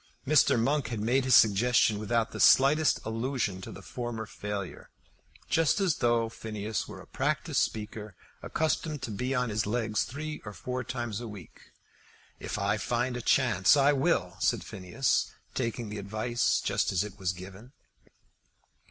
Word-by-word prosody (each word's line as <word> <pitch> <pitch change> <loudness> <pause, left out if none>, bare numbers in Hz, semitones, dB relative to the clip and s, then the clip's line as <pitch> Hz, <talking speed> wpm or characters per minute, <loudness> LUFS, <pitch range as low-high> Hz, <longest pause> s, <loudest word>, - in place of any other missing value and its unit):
Mr. 140 -4 +4
Monk 135 +2 +1
had 115 -1 -4
made 125 +5 +1
his 130 -3 +5
suggestion 110 0 +4
without 115 +1 0
the - - -7
slightest 145 +3 +5
allusion 115 -4 -2
to - - -8
the - - -11
former 120 -3 -5
failure, 105 -3 -6 0.6
just 165 +4 +2
as 190 -6 +1
though 120 -1 +2
Phineas 110 -1 -4
were - - -9
a - - -12
practised - - -1
speaker 105 -2 -4 0.3
accustomed 155 -2 -1
to 115 - -4
be 125 +6 -2
on 125 -2 0
his 105 0 -1
legs 110 -1 0
three 155 +3 -6
or 105 - -7
four 125 +4 -4
times 120 -4 -4
a 120 - -6
week. 100 -6 -12 0.7
"If - - -4
I 100 +2 0
find 120 +3 -1
a 125 - -4
chance, 115 -4 +4
I 140 +1 +5
will," 135 - 0
said - - +1
Phineas, 100 +5 -1 0.2
taking 115 -3 -3
the 105 - -5
advice 110 +4 0
just - - 0
as 95 0 +1
it 105 0 -9
was 95 -2 0
given. 95 +7 -11
115 Hz, 160 wpm, -29 LUFS, 105-130 Hz, 0.7 s, his